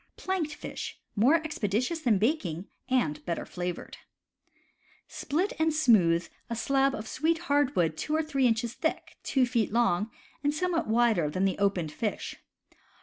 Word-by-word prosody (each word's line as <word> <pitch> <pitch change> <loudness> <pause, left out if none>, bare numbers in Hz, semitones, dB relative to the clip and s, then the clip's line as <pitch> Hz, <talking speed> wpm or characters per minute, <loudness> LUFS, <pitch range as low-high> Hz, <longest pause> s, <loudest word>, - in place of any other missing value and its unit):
Planked 365 -5 -2
Fish. - - -7
— - - -48
More 290 +5 +6
expeditious 310 - -1
than 240 -9 +3
baking, 195 - 0 0.2
and 245 -13 +1
better 170 -2 -3
flavored. 175 -1 -5 1.1
Split 350 +8 -1
and 320 0 +3
smoothe 210 - +4 0.2
a 235 - -2
slab 270 +3 +2
of 215 0 -6
sweet 320 +7 +1 0.2
hardwood 255 - +2
two 305 - -1
or 320 - +2
three 275 -4 +2
inches 235 0 0
thick, 320 - -3
two 265 -2 +2
feet 235 -5 0
long, 220 -3 +2 0.3
and 290 +1 +1
somewhat 345 0 0
wider 220 -8 +3
than 185 +6 0
the 190 0 0
opened 190 -6 +1
fish. 210 +6 -3
240 Hz, 150 wpm, -29 LUFS, 195-305 Hz, 1.1 s, More